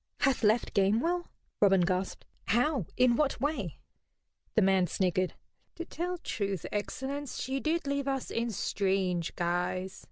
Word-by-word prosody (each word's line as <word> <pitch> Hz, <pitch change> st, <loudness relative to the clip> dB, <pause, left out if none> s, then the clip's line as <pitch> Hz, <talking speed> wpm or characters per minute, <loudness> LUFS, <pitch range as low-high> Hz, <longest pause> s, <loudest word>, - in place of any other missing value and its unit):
"Hath 270 Hz, -2 st, +3 dB
left 220 Hz, +2 st, +3 dB
Gamewell?" 235 Hz, -, +2 dB, 0.3 s
Robin 195 Hz, -2 st, +6 dB
gasped. 185 Hz, +1 st, -1 dB, 0.2 s
"How? 245 Hz, -, +2 dB
In 250 Hz, -1 st, +5 dB
what 290 Hz, +2 st, +1 dB
way?" 260 Hz, -, -2 dB, 0.8 s
The -, -, +5 dB
man 190 Hz, -1 st, +4 dB
sniggered. 185 Hz, +1 st, 0 dB, 0.4 s
"To 340 Hz, -, -5 dB
tell 355 Hz, +2 st, -3 dB
truth, 200 Hz, -, -3 dB
excellence, 270 Hz, +6 st, -3 dB
she 265 Hz, +1 st, -2 dB
did 320 Hz, +2 st, 0 dB
leave 280 Hz, 0 st, -1 dB
us 270 Hz, -1 st, -2 dB
in 235 Hz, +1 st, 0 dB
strange 190 Hz, -4 st, 0 dB
guise. 180 Hz, +2 st, -1 dB
215 Hz, 135 wpm, -30 LUFS, 190-280 Hz, 0.8 s, Robin